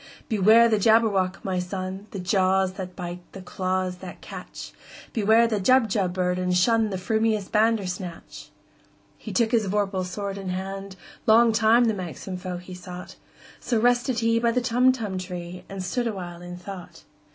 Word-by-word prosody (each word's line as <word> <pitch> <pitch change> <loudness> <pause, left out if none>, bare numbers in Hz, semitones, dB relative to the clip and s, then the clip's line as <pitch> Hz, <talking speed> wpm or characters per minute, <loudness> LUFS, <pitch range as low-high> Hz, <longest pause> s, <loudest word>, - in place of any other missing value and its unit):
"Beware 220 +2 +6
the 220 -2 +2
Jabberwock, 205 -4 +2
my 185 -2 -1
son! 185 +2 -5
The - - -7
jaws 190 0 +2
that 185 -2 -7
bite, 175 -1 -6
the 195 - -8
claws 185 0 -2
that - - -10
catch! - - -9 0.4
Beware 220 +1 +4
the 220 -3 0
Jubjub 215 -4 +3
bird, 180 0 -1
and 180 0 0
shunThe 215 +2 +2
frumious 220 +1 0
Bandersnatch!"He 195 -5 -4
took 230 -2 +1
his 225 -4 +2
vorpal 195 -1 0
sword 200 +2 -5
in 190 -1 -5
hand:Long 195 +4 0
time 225 +2 +4
the 225 - +2
manxome 185 0 -6
foe 180 -1 -5
he 180 +1 -10
sought—So 180 +5 -6
rested 245 0 +2
he 230 0 +2
by 235 0 +2
the 240 +2 +1
Tumtum 245 -5 +1
tree, 180 -1 -7
And 195 -1 -5
stood 240 +6 -1
awhile 175 -5 -6
in 175 0 -8
thought. 180 -1 -10
195 Hz, 150 wpm, -25 LUFS, 185-225 Hz, 0.4 s, Beware